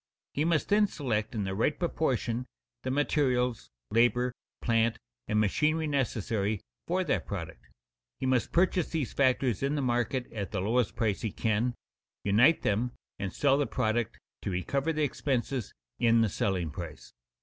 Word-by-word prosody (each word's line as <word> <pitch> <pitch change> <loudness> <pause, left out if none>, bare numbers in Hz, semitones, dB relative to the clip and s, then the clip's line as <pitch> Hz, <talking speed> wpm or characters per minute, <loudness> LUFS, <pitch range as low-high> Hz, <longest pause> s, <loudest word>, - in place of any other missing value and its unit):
He 150 - +1
must 165 -2 +1
then 210 0 +5
select 120 - -2
in 105 - 0
the 95 0 -2
right 115 +9 +1
proportion 125 - -1 0.3
the 130 - -3
materials, 130 -4 +1 0.2
labor, 120 +2 +3 0.3
plant, 115 -1 +2 0.3
and 105 - +2
machinery 155 - +2
necessary 110 -7 0 0.3
for 185 +2 +1
that - - -1
product. 85 -11 -6 0.5
He - - -2
must 130 -2 +1
purchase 180 -1 +2
these 155 -6 -2
factors 130 -4 +2
in 140 +2 +1
the 145 - 0
market 120 +1 0
at 100 -3 -3
the 100 - -2
lowest 110 +4 +1
price 105 -4 0
he 110 - -2
can, 115 +4 0 0.5
unite 115 +11 +5
them 120 +4 +1 0.3
and 95 -2 -2
sell 140 -1 +3
the 145 - +1
product 115 -1 0 0.2
to - - -3
recover 135 - 0
the 155 -1 0
expenses 130 -3 -1 0.3
in 115 -1 +5
the 110 - +3
selling 90 -4 -1
price. 85 -3 -8
120 Hz, 160 wpm, -30 LUFS, 105-140 Hz, 0.5 s, then